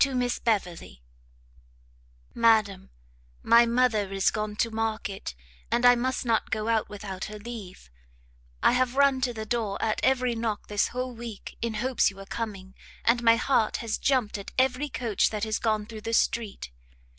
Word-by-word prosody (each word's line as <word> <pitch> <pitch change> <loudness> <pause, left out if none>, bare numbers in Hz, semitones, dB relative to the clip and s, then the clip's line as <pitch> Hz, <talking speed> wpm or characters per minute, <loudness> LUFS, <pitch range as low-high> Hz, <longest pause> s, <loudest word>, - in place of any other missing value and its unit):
To 275 -2 +3
Miss 245 -1 0
Beverley. 175 - -2 1.3
Madam, 215 -5 +2 0.5
My 235 +1 +6
mother 230 -5 +1
is 195 -1 +2
gone 215 -1 -3
to 230 +2 0
market, 220 - -3 0.3
and 240 - +1
I 245 - +9
must 255 +1 -1
not 230 -2 +1
go 215 +1 -2
out 225 -2 +1
without 195 -2 -6
her 210 0 -8
leave; 205 - -9 0.7
I - - +6
have 250 0 +1
run 275 -1 +4
to 250 -1 +1
the 220 -2 -6
door 215 -3 -2
at 215 -1 -1
every 255 -2 +2
knock 225 -2 -3
this 205 -1 +1
whole 250 0 -4
week 230 -3 -8
in 230 -1 -2
hopes 255 +3 +2
you 200 - -12
were 195 0 -10
coming, 195 -3 -6 0.3
and 235 +1 +3
my 230 -1 +6
heart 230 -2 +1
has 220 - -2
jumpt 250 -7 +1
at 200 - -9
every 260 +3 +1
coach 235 -6 0
that 210 -2 -4
has 220 0 -1
gone 215 -2 0
through 215 0 -9
the 225 +1 -4
street. 215 - -1
225 Hz, 175 wpm, -27 LUFS, 210-245 Hz, 1.3 s, I